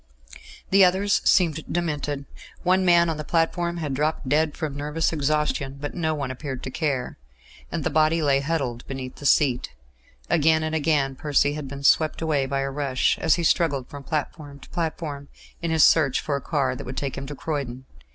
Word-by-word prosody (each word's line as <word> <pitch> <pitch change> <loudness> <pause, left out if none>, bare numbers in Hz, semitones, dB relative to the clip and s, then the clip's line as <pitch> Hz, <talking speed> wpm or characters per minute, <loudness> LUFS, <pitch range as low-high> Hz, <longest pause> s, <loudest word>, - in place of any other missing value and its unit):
The 195 0 +7
others 190 +3 +3
seemed 160 -4 +3
demented; 150 -4 -2 0.4
one 185 +1 +3
man 175 -1 +5
on 160 -2 -2
the 150 - -4
platform 170 +2 0
had 150 -5 -3
dropped 150 0 -1
dead 150 +2 +1
from 155 -4 -3
nervous 150 +3 -1
exhaustion, 145 -2 -1
but 145 0 -5
no 160 -3 -1
one 140 -3 -3
appeared 130 0 -6
to 130 - -5
care; 140 - -2 0.5
and 165 -3 -3
the 160 - -1
body 155 +2 +3
lay 140 -2 +3
huddled 140 -5 -2
beneath 130 -1 -7
a 145 - 0
seat. 130 - +2 0.5
Again 160 -1 +3
and 155 0 -2
again 145 -4 +1
Percy 145 0 +1
had 150 -2 -5
been 140 +1 -8
swept 155 +2 +3
away 150 -4 0
by 135 0 -1
a 135 0 -2
rush, 135 -2 0
as 160 - +3
he 170 - -2
struggled 145 -6 +1
from 145 - -8
platform 145 -1 -4
to - - -14
platform 155 -4 -4 0.3
in 170 - -2
his 160 -2 +4
search 145 -5 +4
for 145 - -2
a 140 - -3
car 135 -3 0
that - - -7
would 130 +1 -7
take 135 0 -3
him 135 0 -6
to 145 - -6
Croydon. 130 -4 -4
150 Hz, 195 wpm, -24 LUFS, 135-160 Hz, 0.5 s, The